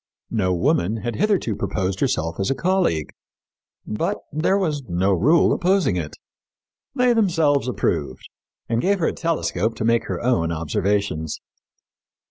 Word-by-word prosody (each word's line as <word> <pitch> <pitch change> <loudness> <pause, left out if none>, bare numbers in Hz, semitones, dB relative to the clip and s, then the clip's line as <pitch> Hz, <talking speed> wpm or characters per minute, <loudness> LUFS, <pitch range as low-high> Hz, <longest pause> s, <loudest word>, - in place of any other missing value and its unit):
No 100 -5 +1
woman 90 +3 +1
had 120 -1 -2
hitherto 195 - +1
proposed 95 -1 -2
herself 85 - -1
as 95 - 0
a 135 - +1
colleague, 175 - 0 0.7
but 105 - -2 0.2
there 165 +6 +2
was 155 -7 -1
no 95 +3 +1
rule 140 - +4
opposing 185 - +2
it. 80 -4 -4 0.8
They 250 -2 +3
themselves 165 - +2
approved, 70 - -2 0.4
and 115 0 0
gave 200 +2 +2
her 170 - 0
a - - -4
telescope 115 - -1
to 110 - -3
make 115 0 +2
her - - -3
own 115 -10 +1
observations. 85 0 -1
115 Hz, 140 wpm, -22 LUFS, -, 0.8 s, rule